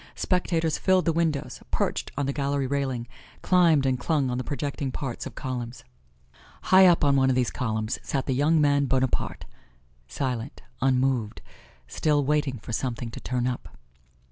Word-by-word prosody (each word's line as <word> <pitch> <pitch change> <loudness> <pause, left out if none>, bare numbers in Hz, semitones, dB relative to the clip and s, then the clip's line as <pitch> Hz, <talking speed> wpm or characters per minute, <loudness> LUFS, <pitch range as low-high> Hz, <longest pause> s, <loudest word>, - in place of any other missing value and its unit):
Spectators 165 -4 0
filled 185 -1 +3
the 165 - +2
windows, 160 -4 -1
perched - - -1
on 145 - 0
the 140 - -1
gallery 140 -1 -1
railing, 130 -3 -2 0.4
climbed 170 -6 +4
and 130 -1 +1
clung 140 -3 0
on 125 - -2
the - - -2
projecting 140 -1 -3
parts 135 -2 -4
of - - -12
columns. 125 -3 -5 0.8
High 190 0 +7
up 175 -3 +4
on 140 -1 +4
one 135 -1 +3
of 130 - +2
these 125 -2 +1
columns 110 -3 -2
sat 135 -4 -2
the 135 - 0
young 150 +5 +3
man 145 -1 +3
Bonaparte, 130 -1 -1 0.6
silent, 125 - -4 0.2
unmoved, 130 -4 +1 0.4
still 145 - +1
waiting 145 -2 0
for 115 +2 -8
something 120 -1 -3
to - - -8
turn 125 -1 -2
up. 125 -1 -4
135 Hz, 165 wpm, -26 LUFS, 125-150 Hz, 0.8 s, High